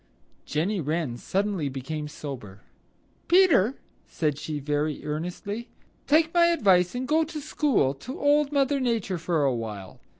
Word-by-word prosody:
Jenny 180 +6 0
Wren 155 -4 -2
suddenly 190 +1 -1
became 150 +3 -5
sober. 130 -10 -8 0.7
"Peter," 320 - +5 0.3
said 150 -4 -1
she 155 -1 -4
very 145 +1 -2
earnestly, 180 +9 -4 0.4
"take 320 +3 +3
my 340 -1 +5
advice 195 - +3
and 255 +1 -3
go 315 +2 +3
to 310 -1 -6
school 285 - +1
to 245 - -8
Old 290 0 +3
Mother 280 0 +2
Nature 225 -8 -1
for 165 -2 0
awhile. 110 -7 -3
180 Hz, 135 wpm, -26 LUFS, -, 0.7 s, Peter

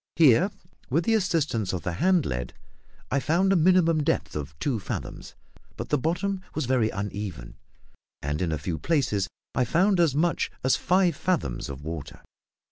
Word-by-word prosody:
Here, 160 - +5 0.4
with 165 +6 +1
the 225 - +3
assistance 160 - 0
of 90 - -3
the 90 - -2
hand 180 - +2
lead, 60 0 -4 0.6
I 140 - +2
found 175 +8 +2
a - - +3
minimum 170 -2 +4
depth - - -1
of 75 -1 -5
two 125 - -1
fathoms; - - -6 0.4
but - - -5
the 150 - +3
bottom 185 +6 -1
was 155 - -1
very 120 -3 +2
uneven, 100 - -5 0.7
and 75 +3 -2
in 85 -3 0
a 80 - 0
few 80 0 -4
places 125 - +1 0.3
I 130 - +2
found 180 - +2
as 160 -6 +3
much 165 +3 +1
as 130 - +4
five 180 -2 +2
fathoms 135 - -1
of 70 +1 -7
water. 80 -2 -6
140 Hz, 170 wpm, -26 LUFS, -, 0.7 s, Here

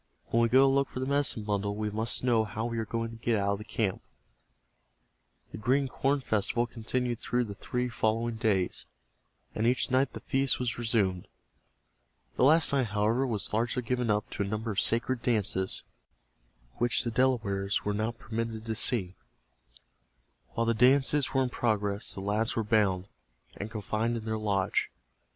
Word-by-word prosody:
When 115 - +3
we 115 - +3
go 130 +3 +6
to - - +6
look 140 0 +2
for - - -6
the 130 - -1
medicine 140 -5 +1
bundle 100 -1 -1
we 105 0 -2
must 110 +4 -2
know 120 -3 +3
how 110 +1 -4
we 115 -1 -2
are 110 - -2
going 115 0 -2
to 115 0 -12
get 115 -2 +2
out 100 0 +1
of 100 - 0
the - - -7
camp." 105 -3 -2 1.5
The - - -7
Green 135 +5 +2
Corn 135 +2 0
Festival 110 +1 0
continued 120 +1 -2
through 125 0 0
the 105 -4 -6
three 125 +5 -2
following 115 0 -1
days, 100 -5 0 0.7
and 110 - 0
each 125 +1 +2
night 130 +2 +2
the - - -6
feast 135 -1 +1
was 120 -1 -2
resumed. 105 -6 0 1.1
The - - +1
last 155 +2 +5
night, 135 -4 +2
however, 110 +6 +1
was 105 -5 -2
largely 120 +3 0
given 125 0 -1
up 105 0 +1
to - - -4
a 100 - 0
number 110 +2 -3
of 100 - 0
sacred 120 +1 +1
dances 100 -6 0 0.9
which 120 -2 +1
the 120 - -2
Delawares 110 -6 0
were 105 - 0
not 110 +3 -2
permitted 115 -1 -4
to 110 - -2
see. 110 -5 +1 1.4
While 115 - 0
the 115 - +2
dances 135 +4 +3
were 135 -1 +2
in 125 - -1
progress 105 -3 0
the 95 - -5
lads 105 +3 0
were 115 - 0
bound, 100 -4 +2 0.5
and 105 - -5
confined 110 +2 -2
in 110 - -7
their 110 -1 -2
lodge. 100 -3 0
115 Hz, 180 wpm, -29 LUFS, 105-125 Hz, 1.5 s, go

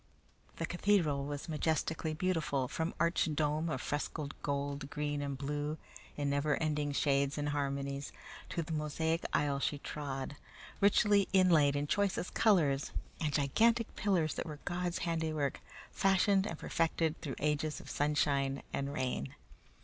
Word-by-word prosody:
The 165 - -2
cathedral 170 -6 +2
was 145 0 -5
majestically 160 0 -1
beautiful, 155 -6 0
from 160 +6 -2
arched 170 -2 +2
dome 155 +2 +1
of 130 -5 -3
frescoed 145 0 -3
gold, 140 0 -2
green, 145 -1 -2
and 140 -1 -3
blue 145 +2 -2 0.4
in 145 -1 -1
never 145 +1 +2
ending 150 -2 0
shades 140 0 +1
and 145 0 -1
harmonies, 140 -1 -2 0.4
to 170 -2 -2
the 165 +1 -5
mosaic 160 +2 -1
aisle 145 -1 +1
she 145 - 0
trod, 140 -1 -5 0.4
richly 200 0 +4
inlaid 165 -7 +5
in 145 0 0
choicest 195 +2 0
colors, 155 -11 +3 0.3
and 155 -3 0
gigantic 225 - +2
pillars 180 -6 +1
that - - -4
were 150 -2 -6
God's 175 0 -1
handiwork 160 -4 -1 0.3
fashioned 195 +1 +3
and 170 - -4
perfected 165 0 0
through 140 -5 -4
ages 150 +1 0
of - - -12
sunshine 140 -2 +1
and 140 0 -1
rain. 125 - -2
150 Hz, 140 wpm, -33 LUFS, 140-165 Hz, 0.4 s, inlaid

